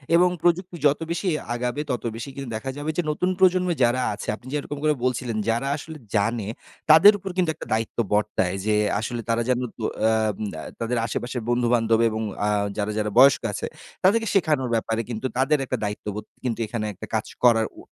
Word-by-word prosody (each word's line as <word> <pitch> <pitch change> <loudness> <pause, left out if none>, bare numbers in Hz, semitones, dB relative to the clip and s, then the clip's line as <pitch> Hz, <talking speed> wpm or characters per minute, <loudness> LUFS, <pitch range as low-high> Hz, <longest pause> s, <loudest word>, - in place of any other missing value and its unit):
এবং 180 +1 +5
প্রযুক্তি 175 +1 +1
যত 145 +1 +4
বেশি 175 +3 -2 0.3
আগাবে, 125 +2 -2
তত 125 - -2
বেশি 115 +4 -6
কিন্তু 135 -3 -6
দেখা 110 +5 -4
যাবে 145 +2 -4
যে - - +3
নতুন 180 +5 0
প্রজন্মে 180 -1 +4
যারা 120 +2 +3
আছে, - - -8
আপনি 120 - -16
যেরকম 145 0 -3
করে 155 0 +4
বলছিলেন 125 -3 -1
যারা 120 +4 0
আসলে 155 +2 -9 0.2
জানে 110 0 +1 0.4
তাদের 165 +7 +9
উপর 195 0 -7
কিন্তু 175 -3 +2
একটা - - -9
দায়িত্ব 110 0 -2 0.2
বর্তায়। 105 -3 +1
যে 110 -1 +2 0.2
আসলে 120 +1 -3
তারা 115 0 +2
যেন 125 - +2 0.2
তো 115 - -6 0.3
আম 110 -2 +1 0.2
আ - - -6 0.2
তাদের 115 +1 -1
আশেপাশের 120 +2 -3
বন্ধু-বান্ধব 120 -2 +2
এবং 110 0 -3 0.2
আ - - +2 0.3
যারা, 105 0 -1
যারা 105 -1 -1
বয়স্ক 140 +2 +7
আছে - - -3 0.4
তাদেরকে 225 +4 +4
শেখানোর 150 -9 +2
ব্যাপারে 115 0 0
কিন্তু 115 +1 -4
তাদের 135 +3 +3
একটা 130 - -2
দায়িত্ববোধ 105 0 -4 0.2
কিন্তু 120 -3 -2
এখানে 110 0 -3
একটা 105 +3 -9
কাজ 110 - 0 0.2
করার 115 -2 +5
উ - - -10
120 Hz, 190 wpm, -24 LUFS, 110-150 Hz, 0.4 s, তাদের